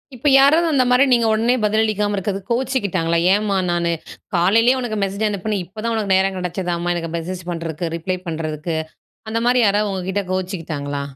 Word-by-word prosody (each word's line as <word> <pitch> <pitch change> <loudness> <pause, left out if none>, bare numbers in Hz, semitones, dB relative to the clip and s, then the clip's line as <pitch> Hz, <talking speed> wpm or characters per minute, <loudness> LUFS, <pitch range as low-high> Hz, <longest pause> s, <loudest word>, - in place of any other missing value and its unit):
இப்ப 255 +4 -3
யாராவது 310 +5 +5
அந்த 270 -4 +3
மாரி 250 +2 +5
நீங்க 235 -2 +3
ஒடனே 230 +3 +2
பதில் 215 +1 +2
அளிக்காம 210 -1 0
இருக்கறதுக்கு 195 +1 -4
கோச்சுகிட்டாங்களா? 200 -10 0 0.2
"ஏன் 210 +1 +1
மா 195 - +1
நானு, 170 -1 0 0.4
காலையிலேயே 225 +9 +4
உனக்கு 235 -4 -3
மெசேஜ் 200 +2 -1
அனுப்புனேன் 205 -1 -2
இப்பதான் 220 +5 -4
உனக்கு 205 -3 0
நேரம் 190 0 +2
கெடச்சதாமா? 175 -1 -2
எனக்கு 165 -1 -4
மெசேஜ் 180 +2 -5
பண்றதுக்கு, 165 -1 -4
ரிப்ளை 185 +3 -3
பண்றதுக்கு?" 160 0 -3 0.5
அந்த 230 - -1
மாரி 250 +1 +4
யாராவது 205 +1 +1
உங்ககிட்ட 190 +1 -2
கோச்சுகிட்டாங்களா? 165 -7 -3
195 Hz, 165 wpm, -20 LUFS, 170-220 Hz, 0.5 s, யாராவது